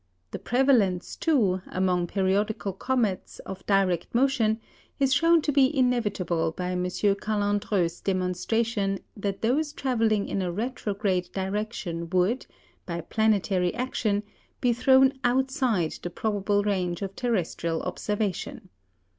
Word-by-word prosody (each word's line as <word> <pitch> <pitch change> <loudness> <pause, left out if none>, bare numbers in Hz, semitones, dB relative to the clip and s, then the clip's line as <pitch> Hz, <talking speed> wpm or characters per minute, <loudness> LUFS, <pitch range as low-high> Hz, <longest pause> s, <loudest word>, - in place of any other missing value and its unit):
The - - -5
prevalence, 235 -9 +2
too, 210 - +2
among 180 -1 0
periodical 195 +2 0
comets, 220 -2 -1
of 190 0 -8
direct 195 -1 +1
motion, 235 -4 +2 0.4
is 270 -1 +3
shown 330 0 +4
to 295 - +1
be 275 0 +3
inevitable 200 -10 +1
by 180 +1 -3
M. 180 0 -1
Callandreau's 205 -2 0
demonstration 195 +3 0 0.2
that 200 -1 -4
those 290 +6 +1
travelling 225 -7 0
in 195 - -2
a 180 -1 -1
retrograde 200 -4 -2
direction 190 -4 -3
would, 185 +8 +1 0.4
by 170 -1 -3
planetary 195 -2 +1
action, 220 -5 -1 0.4
be 245 -1 +2
thrown 265 +2 +5
outside 245 - +1
the 175 - -4
probable 205 +1 0
range 185 -3 -1
of 195 0 -5
terrestrial 175 -8 -1
observation. 205 -3 -3
205 Hz, 120 wpm, -26 LUFS, 185-240 Hz, 0.4 s, thrown